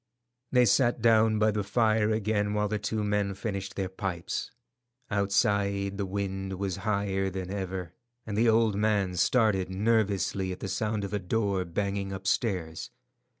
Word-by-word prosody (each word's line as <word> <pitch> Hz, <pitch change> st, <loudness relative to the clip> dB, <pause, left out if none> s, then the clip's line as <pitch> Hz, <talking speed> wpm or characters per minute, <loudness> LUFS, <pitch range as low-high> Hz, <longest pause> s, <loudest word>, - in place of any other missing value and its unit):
They 125 Hz, -1 st, +5 dB
sat 120 Hz, +2 st, +3 dB
down 110 Hz, -1 st, +4 dB
by 110 Hz, 0 st, +3 dB
the 105 Hz, 0 st, -1 dB
fire 110 Hz, 0 st, +2 dB
again 105 Hz, -1 st, 0 dB
while 105 Hz, 0 st, +1 dB
the 105 Hz, 0 st, -2 dB
two 105 Hz, +1 st, -2 dB
men 105 Hz, -1 st, 0 dB
finished 100 Hz, -1 st, -4 dB
their 95 Hz, -1 st, -1 dB
pipes. 95 Hz, -1 st, -4 dB, 0.6 s
Outside, 100 Hz, -1 st, +1 dB
the 100 Hz, -, -1 dB
wind 95 Hz, 0 st, -3 dB
was 95 Hz, -1 st, -3 dB
higher 100 Hz, -1 st, 0 dB
than 95 Hz, -1 st, -5 dB
ever, 95 Hz, -3 st, -4 dB, 0.3 s
and 105 Hz, -, -4 dB
the 115 Hz, +2 st, +4 dB
old 110 Hz, -1 st, +3 dB
man 100 Hz, -3 st, +1 dB
started 95 Hz, -1 st, +2 dB
nervously 100 Hz, -2 st, +1 dB
at 90 Hz, -, -6 dB
the -, -, -4 dB
sound 105 Hz, +2 st, -1 dB
of 100 Hz, +1 st, -5 dB
a 105 Hz, -, 0 dB
door 100 Hz, -1 st, 0 dB
banging 100 Hz, +2 st, -2 dB
upstairs. 95 Hz, -4 st, -2 dB
100 Hz, 155 wpm, -28 LUFS, 95-110 Hz, 0.6 s, They